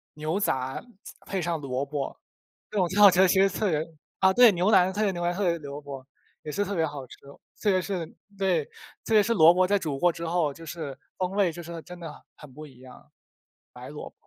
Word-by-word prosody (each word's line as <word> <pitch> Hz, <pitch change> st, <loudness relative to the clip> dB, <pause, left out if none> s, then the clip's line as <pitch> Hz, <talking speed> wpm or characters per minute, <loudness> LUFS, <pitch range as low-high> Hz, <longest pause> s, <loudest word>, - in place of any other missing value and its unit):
牛 155 Hz, +5 st, -2 dB
杂 130 Hz, -9 st, -1 dB, 0.5 s
配 195 Hz, -, -2 dB
上 170 Hz, -1 st, -2 dB
萝 135 Hz, 0 st, -3 dB
卜， 140 Hz, -1 st, -4 dB, 0.5 s
这 215 Hz, -, -5 dB
种 180 Hz, -3 st, +2 dB
挺 190 Hz, +4 st, -2 dB
好 205 Hz, -, +11 dB
吃 185 Hz, +1 st, +4 dB
其 190 Hz, +2 st, +3 dB
实 195 Hz, -, +4 dB
特 200 Hz, +2 st, -1 dB
别 155 Hz, -2 st, 0 dB, 0.4 s
啊， 190 Hz, 0 st, +5 dB
对 245 Hz, +1 st, +7 dB
牛 180 Hz, +1 st, +1 dB
腩 190 Hz, -3 st, +5 dB
特 205 Hz, -, -2 dB
别 210 Hz, -2 st, +2 dB
牛 175 Hz, -2 st, -5 dB
腩 175 Hz, 0 st, 0 dB
配 175 Hz, -3 st, 0 dB
萝 145 Hz, -2 st, -8 dB
卜， 140 Hz, -2 st, -9 dB, 0.4 s
也 150 Hz, -, -6 dB
是 200 Hz, +6 st, 0 dB
特 200 Hz, 0 st, -4 dB
别 165 Hz, -2 st, +1 dB
好 145 Hz, -3 st, -7 dB
吃。 -, -, -14 dB, 0.4 s
特 210 Hz, -, +2 dB
别 185 Hz, -1 st, +2 dB
是 180 Hz, -1 st, -3 dB, 0.3 s
对， 180 Hz, -6 st, +1 dB, 0.4 s
特 -, -, -1 dB
别 210 Hz, -1 st, +6 dB
是 230 Hz, +3 st, +1 dB
萝 165 Hz, -5 st, +7 dB
卜 185 Hz, +1 st, +3 dB
在 200 Hz, +2 st, +2 dB
煮 150 Hz, -6 st, -3 dB
过 175 Hz, +5 st, +3 dB
之 170 Hz, 0 st, -7 dB
后 165 Hz, -4 st, 0 dB
就 165 Hz, +3 st, -12 dB
是 150 Hz, -4 st, -7 dB, 0.2 s
风 185 Hz, 0 st, -2 dB
味 195 Hz, -3 st, +1 dB
就 175 Hz, -, -8 dB
是 170 Hz, 0 st, -8 dB
真 180 Hz, +2 st, -11 dB
的 165 Hz, -3 st, -7 dB
很 -, -, -15 dB
很 145 Hz, -4 st, -14 dB
不 155 Hz, +3 st, -10 dB
一 130 Hz, -3 st, -18 dB
样 130 Hz, -1 st, -15 dB, 0.6 s
白 -, -, -11 dB
萝 -, -, -8 dB
卜。 -, -, -32 dB
175 Hz, 260 characters per minute, -26 LUFS, 150-190 Hz, 0.6 s, 好